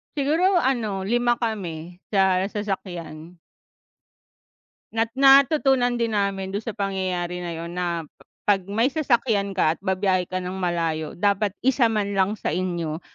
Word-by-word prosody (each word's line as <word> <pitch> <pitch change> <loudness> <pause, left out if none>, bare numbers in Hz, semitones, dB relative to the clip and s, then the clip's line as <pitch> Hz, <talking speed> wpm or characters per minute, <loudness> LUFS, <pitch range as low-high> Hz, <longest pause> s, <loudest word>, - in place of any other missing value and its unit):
Siguro 325 +7 +2
ano, 220 -7 0
5 240 +3 +2
kami 180 -7 -5
sa 190 -1 +2
sasakyan. 180 -5 -6 1.6
Nat 225 0 +1
natutunan 270 -2 +5
din 230 -2 -1
namin 195 -1 -1
dun 205 - -2
sa 225 -1 -6
pangyayari 185 -3 -2
na 175 -1 -4
'yon 170 +1 -6
na, 170 -2 -2 0.4
'pag 200 -2 +3
may 230 +6 +1
sasakyan 230 -9 +1
ka 155 -2 +3
at - - -16
ba-biyahe 190 -2 0
ka 185 - -2
ng 180 0 -4
malayo 165 -3 -2
dapat 205 +1 +2 0.2
isa 255 -3 +4
man 205 -2 -1
lang 195 +2 +1
sa 155 - -2
inyo 175 -3 -2
195 Hz, 140 wpm, -24 LUFS, 180-230 Hz, 1.6 s, natutunan